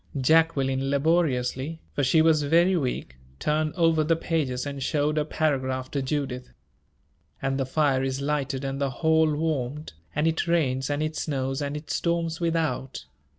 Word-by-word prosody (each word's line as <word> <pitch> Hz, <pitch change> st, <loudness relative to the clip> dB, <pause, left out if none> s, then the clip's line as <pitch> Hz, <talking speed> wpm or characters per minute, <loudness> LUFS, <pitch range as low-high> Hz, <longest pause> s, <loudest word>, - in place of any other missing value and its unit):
Jacqueline, 135 Hz, -2 st, +2 dB
laboriously 140 Hz, -1 st, 0 dB
for 145 Hz, -, 0 dB
she 155 Hz, +5 st, +4 dB
was 160 Hz, -2 st, +4 dB
very 170 Hz, +6 st, +3 dB
weak 125 Hz, -, -3 dB, 0.2 s
turned 155 Hz, 0 st, 0 dB
over 165 Hz, -3 st, +3 dB
the 165 Hz, +2 st, +2 dB
pages 145 Hz, -6 st, -1 dB
and 140 Hz, -1 st, -5 dB
showed 150 Hz, +2 st, 0 dB
a 155 Hz, -, +2 dB
paragraph 130 Hz, -4 st, -1 dB
to 140 Hz, -, -1 dB
Judith: 130 Hz, -2 st, -3 dB, 0.9 s
"And 135 Hz, 0 st, -1 dB
the 135 Hz, -, -1 dB
fire 140 Hz, -2 st, +2 dB
is 135 Hz, 0 st, -2 dB
lighted 140 Hz, -2 st, -2 dB
and 135 Hz, 0 st, -3 dB
the 140 Hz, -, +1 dB
hall 160 Hz, +3 st, +2 dB
warmed, 150 Hz, -, -2 dB, 0.2 s
and 150 Hz, +2 st, +1 dB
it 165 Hz, +1 st, 0 dB
rains 135 Hz, -6 st, +1 dB
and 145 Hz, +1 st, 0 dB
it 155 Hz, 0 st, -3 dB
snows 135 Hz, -2 st, -2 dB
and 145 Hz, +1 st, -2 dB
it 150 Hz, -, -8 dB
storms 170 Hz, -1 st, -1 dB
without. 165 Hz, -, -2 dB
145 Hz, 160 wpm, -26 LUFS, 135-160 Hz, 0.9 s, she